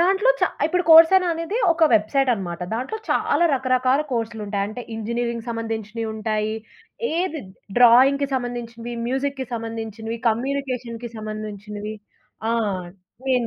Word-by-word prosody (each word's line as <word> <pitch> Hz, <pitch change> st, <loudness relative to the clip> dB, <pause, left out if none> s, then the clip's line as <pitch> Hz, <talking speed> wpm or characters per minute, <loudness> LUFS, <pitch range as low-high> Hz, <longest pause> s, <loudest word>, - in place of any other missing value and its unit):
దాంట్లో 390 Hz, +7 st, +4 dB
చ -, -, -3 dB, 0.2 s
ఇప్పుడు 360 Hz, +2 st, +1 dB
'కోర్స్ 325 Hz, +1 st, +10 dB
ఎరా' 365 Hz, -2 st, +2 dB
అనేది 335 Hz, +6 st, -3 dB, 0.2 s
ఒక 330 Hz, -1 st, +3 dB
వెబ్‌సైటనమాట. 215 Hz, -5 st, +1 dB
దాంట్లో 260 Hz, -, -3 dB
చాలా 345 Hz, -, +2 dB
రకరకాల 255 Hz, +1 st, +2 dB
కోర్సులుంటాయి. 220 Hz, -4 st, -2 dB
అంటే, 240 Hz, +3 st, -7 dB
ఇంజనీరింగ్‌కి 235 Hz, +1 st, -3 dB
సంబంధించినయి 225 Hz, -1 st, -4 dB
ఉంటాయి. 215 Hz, 0 st, -1 dB, 0.6 s
ఏది 330 Hz, -3 st, -1 dB, 0.4 s
డ్రాయింగ్‌కి 265 Hz, +4 st, +6 dB
సంబంధించినవి, 240 Hz, -1 st, -4 dB
మ్యూజిక్‌కి 265 Hz, 0 st, -2 dB
సంబంధించినవి, 225 Hz, 0 st, -5 dB
కమ్యూనికేషన్‌కి 245 Hz, -1 st, -3 dB
సంబంధించినవి. 215 Hz, -1 st, -6 dB, 0.6 s
ఆ! -, -, +2 dB, 0.8 s
నేను 250 Hz, -3 st, +2 dB
235 Hz, 110 wpm, -23 LUFS, 220-270 Hz, 0.8 s, కోర్స్